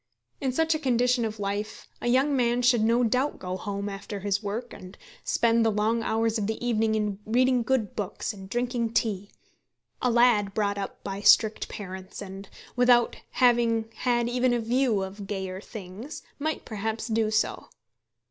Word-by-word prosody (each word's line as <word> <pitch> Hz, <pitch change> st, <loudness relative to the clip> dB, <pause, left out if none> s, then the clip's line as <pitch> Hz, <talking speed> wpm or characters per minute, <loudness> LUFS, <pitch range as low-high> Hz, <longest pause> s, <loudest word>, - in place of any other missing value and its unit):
In 265 Hz, -, 0 dB
such 320 Hz, +5 st, +2 dB
a 310 Hz, -, -1 dB
condition 250 Hz, -3 st, +2 dB
of 215 Hz, -1 st, -5 dB
life 205 Hz, +2 st, -4 dB
a -, -, -2 dB
young 265 Hz, +4 st, +3 dB
man 245 Hz, -1 st, +1 dB
should 245 Hz, -2 st, +4 dB
no 235 Hz, +2 st, +3 dB
doubt 255 Hz, +5 st, +1 dB
go 185 Hz, 0 st, -4 dB
home 200 Hz, +1 st, -4 dB
after 200 Hz, 0 st, -6 dB
his 200 Hz, +1 st, 0 dB
work, 220 Hz, +4 st, -4 dB
and 185 Hz, +2 st, -11 dB, 0.3 s
spend 230 Hz, 0 st, +2 dB
the 225 Hz, -, +3 dB
long 220 Hz, +2 st, +1 dB
hours 225 Hz, 0 st, 0 dB
of 200 Hz, -, -1 dB
the 220 Hz, 0 st, -2 dB
evening 220 Hz, -2 st, +2 dB
in 210 Hz, -2 st, -1 dB
reading 250 Hz, +3 st, +2 dB
good 235 Hz, -3 st, 0 dB
books 210 Hz, +2 st, -3 dB
and 190 Hz, -2 st, -11 dB
drinking 240 Hz, 0 st, -1 dB
tea. 205 Hz, -4 st, 0 dB, 0.7 s
A 250 Hz, -, +2 dB
lad 230 Hz, -4 st, +3 dB
brought 200 Hz, -2 st, 0 dB
up 195 Hz, -, -6 dB
by 195 Hz, 0 st, -4 dB
strict 215 Hz, +1 st, +4 dB
parents, 190 Hz, -1 st, -8 dB
and 195 Hz, -1 st, -8 dB, 0.3 s
without 245 Hz, -1 st, +4 dB, 0.2 s
having 235 Hz, -3 st, +3 dB
had 240 Hz, -2 st, +1 dB
even 245 Hz, 0 st, +2 dB
a -, -, 0 dB
view 235 Hz, -3 st, +1 dB
of 195 Hz, +1 st, -7 dB
gayer 190 Hz, -2 st, -4 dB
things, 215 Hz, -, -9 dB, 0.2 s
might 310 Hz, +2 st, -2 dB
perhaps 220 Hz, +1 st, -3 dB
do 220 Hz, -1 st, +1 dB
so. 215 Hz, 0 st, 0 dB
225 Hz, 175 wpm, -27 LUFS, 205-245 Hz, 0.7 s, should